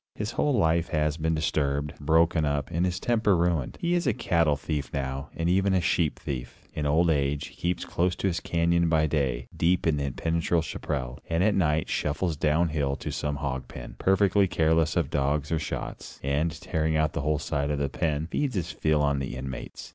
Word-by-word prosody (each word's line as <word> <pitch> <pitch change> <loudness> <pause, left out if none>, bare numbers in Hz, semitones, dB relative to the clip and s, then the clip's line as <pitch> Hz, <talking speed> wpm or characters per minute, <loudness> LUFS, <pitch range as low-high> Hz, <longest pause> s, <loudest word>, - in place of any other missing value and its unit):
His 105 +2 -3
whole 145 +2 +1
life 85 -3 +2
has 75 -2 +1
been 80 0 0
disturbed, 75 -2 0
broken 80 +1 +3
up; 70 +1 -1
and 85 +2 +1
his 90 0 -2
temper 110 -5 +2
ruined. 85 -5 0
He 170 +1 0
is 175 -4 +1
a 120 - +2
cattle 85 -4 +2
thief 70 -2 -3
now, 70 +1 -3
and 85 - -1
even 95 +2 +3
a - - +4
sheep 85 -2 +1
thief. 65 -2 -6
In 75 -1 -2
old 80 +3 +3
age, 70 -1 0
he - - -18
keeps 90 0 -1
close 90 +1 0
to - - -4
his 90 -3 +1
canyon 85 0 +1
by 80 -1 +3
day, 70 -6 -1
deep 90 +2 +2
in 80 -3 +2
the 70 - -1
impenetrable 80 +5 0
chaparral, 65 -6 -4
and 85 +2 +2
at 105 +1 +3
night 80 -5 +1
shuffles 80 +3 -1
down 80 +4 +2
hill 70 -3 0
to - - -5
some 75 -1 -2
hog 70 -3 -3
pen, - - -9
perfectly 95 +1 +3
careless 80 -1 +2
of 80 -5 0
dogs 70 +2 0
or 80 - +1
shots, 75 - -6
and, 75 +4 0
tearing 80 0 0
out 75 -1 +1
a - - -1
whole 75 +1 +1
side 70 -1 -2
of 75 - 0
the 70 0 0
pen, 75 +2 -1
feeds 140 -5 -1
his 85 -3 -2
fill 75 -2 +1
on 70 -1 +1
the 65 -2 -4
inmates. 65 -1 -7
80 Hz, 210 wpm, -27 LUFS, 70-85 Hz, -, a